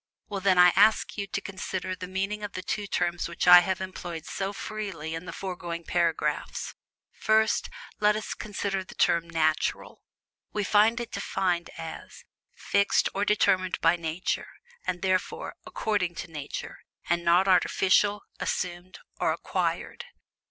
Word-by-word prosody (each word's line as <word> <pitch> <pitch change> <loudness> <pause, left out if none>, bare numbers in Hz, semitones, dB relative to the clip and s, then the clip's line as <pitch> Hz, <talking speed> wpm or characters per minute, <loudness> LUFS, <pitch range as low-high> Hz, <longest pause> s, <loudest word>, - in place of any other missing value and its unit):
Well, 200 -2 -3
then, 190 -1 +3
I 180 0 +7
ask 210 +3 +4
you 200 -2 -3
to 205 +2 -3
consider 190 -1 -4
the 180 0 -7
meaning 195 +3 -2
of 205 -1 -5
the 185 - -5
two 205 +2 -3
terms 175 -2 -1
which 170 - -3
I 180 0 +11
have 185 +1 -1
employed 175 -3 -6
so 195 0 -3
freely 195 -7 -5
in 165 +2 -5
the - - -6
foregoing 175 -3 -5
paragraphs: 165 -4 -1 0.4
First, 220 0 +2 0.3
let 210 0 +4
us 215 - -3
consider 200 -2 -3
the - - -13
term, 170 0 +2
"NATURAL"; 155 -1 0 0.5
we 210 - 0
find 215 +4 +4
it 235 - -5
defined 180 -3 -1
as 165 -1 -8 0.3
"FIXED 200 0 +2
OR 200 +1 0
DETERMINED 185 -3 +2
BY 165 +1 +4
NATURE, 165 +2 -2 0.4
AND, 180 0 -2
THEREFORE, 185 -1 -1
ACCORDING 190 -6 -1
TO 165 - -7
NATURE, 145 -3 -6 0.3
AND 175 0 +1
NOT 175 +3 +4
ARTIFICIAL, 195 +2 +3 0.2
ASSUMED, 175 +1 -3 0.2
OR - - +2
ACQUIRED." - - -2
185 Hz, 150 wpm, -27 LUFS, 170-200 Hz, 0.5 s, I